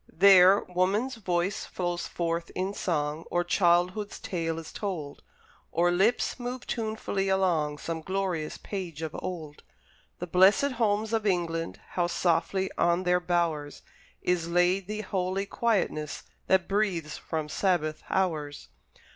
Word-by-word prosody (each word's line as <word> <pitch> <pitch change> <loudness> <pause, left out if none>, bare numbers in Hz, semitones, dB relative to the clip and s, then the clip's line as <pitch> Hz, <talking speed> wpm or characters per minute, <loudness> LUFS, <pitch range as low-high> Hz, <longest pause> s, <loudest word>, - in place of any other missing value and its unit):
There 190 +1 +7
woman's 195 +8 0
voice 180 -2 -1
flows 175 -1 -3
forth 170 0 -2
in 190 +2 -1
song, 155 -4 -1
Or 175 0 +1
childhood's 180 +3 +2
tale 165 -3 -3
is 165 -1 -8
told, 170 -9 -5 0.5
Or 175 +1 +2
lips 200 +9 +1
move 245 +1 -5
tunefully 215 -4 -2
along 170 -6 +1
Some 165 +1 -4
glorious 185 -3 -2
page 175 -6 -6
of 160 0 -4
old. 160 -5 -6 0.6
The 180 - -4
blessed 190 - +4
homes 215 0 +1
of 220 -2 +1
England! 165 -3 -1
How 175 -1 0
softly 185 +2 0
on 175 +1 +3
their 180 0 +3
bowers 170 -5 -1 0.4
Is 170 -2 0
laid 175 +2 +2
the 215 +1 -3
holy 190 -1 -1
quietness 195 -9 -1 0.2
That 190 -2 +3
breathes 190 -7 -1
from 160 -2 -3
Sabbath 155 -2 0
hours! 155 -6 -1
180 Hz, 130 wpm, -28 LUFS, 165-195 Hz, 0.6 s, There